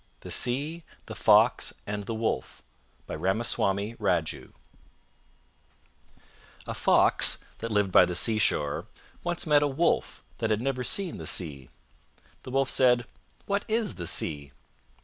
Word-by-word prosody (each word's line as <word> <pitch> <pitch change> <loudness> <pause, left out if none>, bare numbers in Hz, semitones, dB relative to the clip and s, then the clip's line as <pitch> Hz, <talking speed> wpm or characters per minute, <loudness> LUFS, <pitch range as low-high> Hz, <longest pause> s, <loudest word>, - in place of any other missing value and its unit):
THE - - -8
SEA, 145 +7 +1 0.2
THE - - -8
FOX, - - +3
AND 105 0 -5
THE 115 - -4
WOLF 110 0 -3 0.4
By - - -7
Ramaswami 100 +1 0
Raju 80 -9 -2 2.1
A - - -5
fox - - +4 0.2
that 115 - -4
lived 105 -3 +1
by 90 - +7
the 90 0 -4
seashore 100 -8 +1 0.4
once 175 -1 -3
met 150 -2 +4
a 145 - +2
Wolf 150 +5 -1 0.2
that 115 - -1
had 110 -1 +1
never 130 +1 -2
seen 190 +5 -2
the - - -7
Sea. 70 -7 -2 0.7
The - - -10
Wolf 135 +1 0
said, 125 -2 +3 0.4
"What 200 0 -1
is 220 -1 0
the 85 -2 -5
Sea?" 70 -3 -1
115 Hz, 135 wpm, -27 LUFS, 95-135 Hz, 2.1 s, by